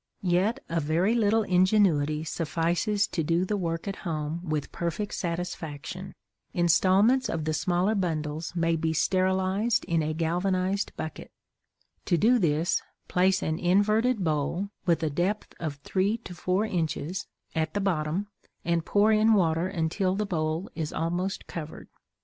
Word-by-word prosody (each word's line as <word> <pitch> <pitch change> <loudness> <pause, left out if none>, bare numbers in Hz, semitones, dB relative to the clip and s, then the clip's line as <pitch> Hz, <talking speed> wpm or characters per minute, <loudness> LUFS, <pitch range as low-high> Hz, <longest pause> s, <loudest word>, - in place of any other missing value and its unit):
Yet 190 +8 +1
a 165 0 0
very 165 +8 +1
little 225 -1 +3
ingenuity 180 -6 +3
suffices 170 +6 0
to 170 - -1
do 170 +3 +1
the 210 - -1
work 165 -2 -3
at 195 - -3
home 155 -1 -3
with 150 -2 -2
perfect 170 +5 -3
satisfaction. 175 0 -5 0.4
Installments 190 +9 +4
of 160 -2 -2
the 155 - 0
smaller 180 +6 +1
bundles 160 -4 -2
may 165 -1 +2
be 160 0 0
sterilized 190 +6 +1
in 165 -1 +1
a 155 0 -2
galvanized 185 +4 0
bucket. 155 - -6 0.8
To 175 - +2
do 240 +6 +4
this 165 -2 +1 0.3
place 190 +2 +2
an 155 +1 -1
inverted 210 +5 +2
bowl, 160 +5 -1 0.2
with 170 -1 +2
a 155 - 0
depth 185 +8 -1
of 155 -4 -3
three 190 +9 0
to 180 - -8
four 185 +4 0
inches, 175 -1 -2 0.3
at 160 +1 -1
the - - +1
bottom, 180 -1 0 0.4
and 170 -1 +1
pour 205 +5 +3
in 220 +1 +5
water 165 -2 +2
until 185 +1 0
the 210 +1 -1
bowl 160 -1 -1
is 160 -3 -3
almost 175 +4 -2
covered. 160 -2 -8
175 Hz, 150 wpm, -27 LUFS, 160-195 Hz, 0.8 s, in